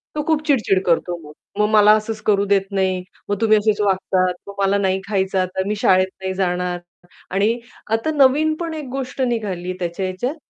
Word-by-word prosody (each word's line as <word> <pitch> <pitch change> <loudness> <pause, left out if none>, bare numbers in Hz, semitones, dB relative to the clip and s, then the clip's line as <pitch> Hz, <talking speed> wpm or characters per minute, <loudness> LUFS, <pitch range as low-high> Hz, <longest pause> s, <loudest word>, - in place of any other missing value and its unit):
तो 300 - -1
खूप 315 -2 +2
चिड-चिड 215 -9 +2
करतो 175 +1 +1
मग. 150 -2 -13 0.3
"मग 210 - +4
मला 210 0 +7
असंच 215 0 -5
करू 200 -1 +3
देत 200 -1 +3
नाही, 190 -2 0 0.3
मग 205 - +1
तुम्ही 215 -1 +5
असेच 210 0 +1
वागतात, 190 -2 +1
मग 200 - -7
मला 195 +1 +3
नाही 190 -1 +1
खायचं 190 -2 0
आता, 185 +1 -1
मी 210 - 0
शाळेत 185 0 +4
नाही 190 0 -2
जाणार" 180 -1 -1 0.5
आणि 210 +5 +1 0.3
आता 225 +8 +1
नवीन 295 +3 +4
पण 335 -1 -3
एक 305 -3 -5
गोष्ट 265 0 -4
निघाली 205 -8 -2
त्याच्या 175 +2 -3
ह्याच्यात, 185 - -3
200 Hz, 190 wpm, -20 LUFS, 185-225 Hz, 0.5 s, मला